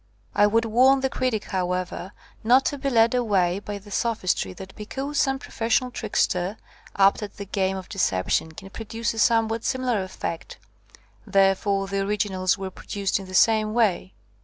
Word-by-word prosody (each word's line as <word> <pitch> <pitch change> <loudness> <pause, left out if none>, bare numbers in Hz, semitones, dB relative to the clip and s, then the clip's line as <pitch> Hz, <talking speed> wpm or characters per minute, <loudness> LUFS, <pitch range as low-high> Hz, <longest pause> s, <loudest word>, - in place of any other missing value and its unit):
I 205 - +5
would 225 +2 +2
warn 260 +4 +4
the 265 0 0
critic, 240 -5 -1
however, 185 0 -3 0.3
not 250 +4 +5
to 285 - -1
be 275 +1 -1
led 230 -2 +4
away 200 -7 +1
by 205 0 -6
the 205 +1 -14
sophistry 195 - 0
that 190 - -11
because 275 +7 -4
some 270 0 +2
professional 250 0 -1
trickster, 195 -3 -1 0.4
apt 195 +1 +4
at 205 -1 -7
the 200 - -6
game 190 0 -1
of 185 - -8
deception, 160 - 0
can 195 +4 -11
produce 225 +1 -3
a 225 - -5
somewhat 225 0 +2
simi 255 -1 -1
lar 235 -5 +1
effect, 180 -2 -6 0.7
therefore 195 0 +2
the 195 0 -2
originals 195 -2 0
were 190 -1 -5
pro - - -15
duced 200 -1 -1
in 195 - -9
the 185 - -7
same 215 +1 +3
way. 200 -5 +1
205 Hz, 175 wpm, -24 LUFS, 190-230 Hz, 0.7 s, I